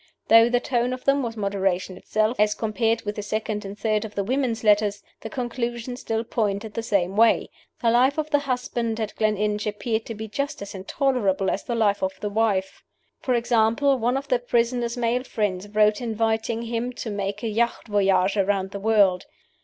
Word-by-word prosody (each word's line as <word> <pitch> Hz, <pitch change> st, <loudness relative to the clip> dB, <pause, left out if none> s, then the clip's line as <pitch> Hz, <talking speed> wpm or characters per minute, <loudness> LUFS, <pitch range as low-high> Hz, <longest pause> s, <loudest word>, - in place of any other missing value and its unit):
Though 230 Hz, +1 st, +7 dB
the 245 Hz, 0 st, +2 dB
tone 245 Hz, 0 st, 0 dB
of 255 Hz, -, -7 dB
them 275 Hz, 0 st, +3 dB
was 230 Hz, -3 st, -4 dB
moderation 195 Hz, -2 st, -1 dB
itself 215 Hz, +5 st, -1 dB
as 210 Hz, 0 st, +3 dB
compared 225 Hz, +1 st, 0 dB
with 210 Hz, 0 st, -4 dB
the -, -, -2 dB
second 215 Hz, 0 st, -3 dB
and 200 Hz, +1 st, -7 dB
third 215 Hz, -2 st, 0 dB
of 215 Hz, -1 st, -8 dB
the 200 Hz, -, 0 dB
women's 240 Hz, 0 st, -1 dB
letters, 205 Hz, -1 st, +3 dB, 0.2 s
the 220 Hz, -, -7 dB
conclusion 240 Hz, 0 st, -3 dB
still 225 Hz, -3 st, -2 dB
pointed 215 Hz, -2 st, -2 dB
the 230 Hz, -, -2 dB
same 195 Hz, -4 st, 0 dB
way. 230 Hz, +1 st, +3 dB, 0.3 s
The 230 Hz, -, +4 dB
life 255 Hz, +5 st, +3 dB
of 310 Hz, 0 st, -2 dB
the 290 Hz, -, +4 dB
husband 245 Hz, -4 st, -2 dB
at 215 Hz, -1 st, -3 dB
Gleninch 210 Hz, 0 st, 0 dB
appeared 220 Hz, +2 st, -2 dB
to 230 Hz, -, -5 dB
be 220 Hz, +1 st, -6 dB
just 280 Hz, +7 st, -3 dB
as 200 Hz, -, -8 dB
intolerable 195 Hz, -1 st, 0 dB
as 195 Hz, -, -3 dB
the 240 Hz, -, -2 dB
life 205 Hz, -3 st, +2 dB
of 190 Hz, 0 st, -2 dB
the 210 Hz, -, -3 dB
wife. 200 Hz, -3 st, 0 dB, 0.4 s
For 255 Hz, -, 0 dB
example, 235 Hz, +3 st, +2 dB
one 245 Hz, +3 st, +1 dB
of 275 Hz, +1 st, -5 dB
the 250 Hz, -3 st, +2 dB
prisoner's 240 Hz, 0 st, 0 dB
male 245 Hz, +1 st, 0 dB
friends 205 Hz, -6 st, -2 dB
wrote 210 Hz, +1 st, +3 dB
inviting 225 Hz, 0 st, -1 dB
him 235 Hz, +2 st, -3 dB
to 235 Hz, -2 st, -5 dB
make 200 Hz, +1 st, -3 dB
a -, -, 0 dB
yacht 235 Hz, +2 st, -1 dB
voyage 195 Hz, -1 st, +2 dB
around 195 Hz, -1 st, +1 dB
the 200 Hz, -, -5 dB
world. 200 Hz, -3 st, +3 dB
220 Hz, 195 wpm, -24 LUFS, 205-240 Hz, 0.4 s, Though